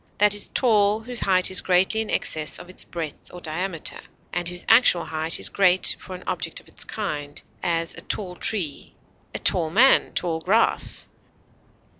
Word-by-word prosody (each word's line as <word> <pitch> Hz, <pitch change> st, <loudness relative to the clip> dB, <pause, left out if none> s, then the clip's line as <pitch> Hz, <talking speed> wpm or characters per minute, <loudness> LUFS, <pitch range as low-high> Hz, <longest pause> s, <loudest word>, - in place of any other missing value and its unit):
That 210 Hz, 0 st, +4 dB
is 205 Hz, -, +1 dB
tall 215 Hz, -3 st, +2 dB
whose 245 Hz, +1 st, -3 dB
height 185 Hz, -1 st, +2 dB
is 185 Hz, -, +4 dB
greatly 190 Hz, +4 st, +1 dB
in 220 Hz, -, -6 dB
excess 155 Hz, -2 st, -2 dB
of 180 Hz, -, -12 dB
its -, -, -3 dB
breadth 165 Hz, -4 st, -8 dB
or 180 Hz, -, -10 dB
diameter, 170 Hz, +1 st, -4 dB, 0.3 s
and 175 Hz, 0 st, -3 dB
whose 175 Hz, 0 st, -4 dB
actual 225 Hz, -7 st, +4 dB
height 160 Hz, +1 st, -1 dB
is -, -, +3 dB
great 185 Hz, -2 st, +4 dB
for 185 Hz, -, -9 dB
an 180 Hz, -, -11 dB
object -, -, -3 dB
of -, -, -22 dB
its -, -, -4 dB
kind; 145 Hz, -9 st, -5 dB, 0.2 s
as, 165 Hz, -2 st, -2 dB
a -, -, -9 dB
tall 180 Hz, -4 st, -4 dB
tree; 175 Hz, -8 st, 0 dB, 0.4 s
a -, -, 0 dB
tall 165 Hz, -3 st, +3 dB
man; 235 Hz, +11 st, +4 dB
tall 165 Hz, -2 st, -2 dB
grass. 200 Hz, +8 st, +1 dB
180 Hz, 175 wpm, -23 LUFS, 165-205 Hz, 0.4 s, That